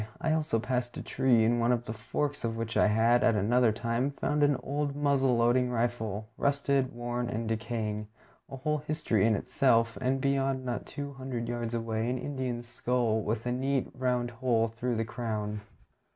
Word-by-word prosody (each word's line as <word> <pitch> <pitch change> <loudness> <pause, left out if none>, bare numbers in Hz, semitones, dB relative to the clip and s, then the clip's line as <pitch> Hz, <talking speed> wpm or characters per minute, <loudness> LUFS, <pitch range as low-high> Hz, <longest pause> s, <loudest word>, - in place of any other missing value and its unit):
I 160 -2 +1
also 155 -7 +1
passed 120 +1 -2
a - - -5
tree 120 -4 +3
in 120 +1 +2
one 120 +1 +3
of 120 -1 0
the 110 - -4
forks 140 +6 -3
of 115 -1 -2
which 115 0 -3
I - - +5
had, 115 +3 +4
at 115 - +4
another 115 +3 +3
time, 115 +4 -1
found 150 +1 -1
an 145 -1 +4
old 145 0 -2
muzzle 140 -4 +2
loading 120 +2 +3
rifle, 115 -3 -2
rusted, 140 -2 +1
worn, 120 0 -3
and 115 0 -3
decaying, 110 -1 -2 0.4
a - - -6
whole 150 +3 0
history 150 -9 +1
in 110 - +3
itself, 115 -1 +2
and 130 +1 +1
beyond, 135 -1 0
not 120 -1 -3
two 140 0 -6
hundred 130 -3 -4
yards 120 -1 -3
away, 115 0 -1
an 125 - -1
Indian's 125 -3 -3
skull 120 -2 0
with 110 +2 -2
a 125 - 0
neat 135 +1 0
round 125 -1 0
hole 115 -2 +1
through 120 +2 -2
the 115 0 -1
crown. 110 -3 -3
120 Hz, 185 wpm, -30 LUFS, 115-135 Hz, 0.4 s, I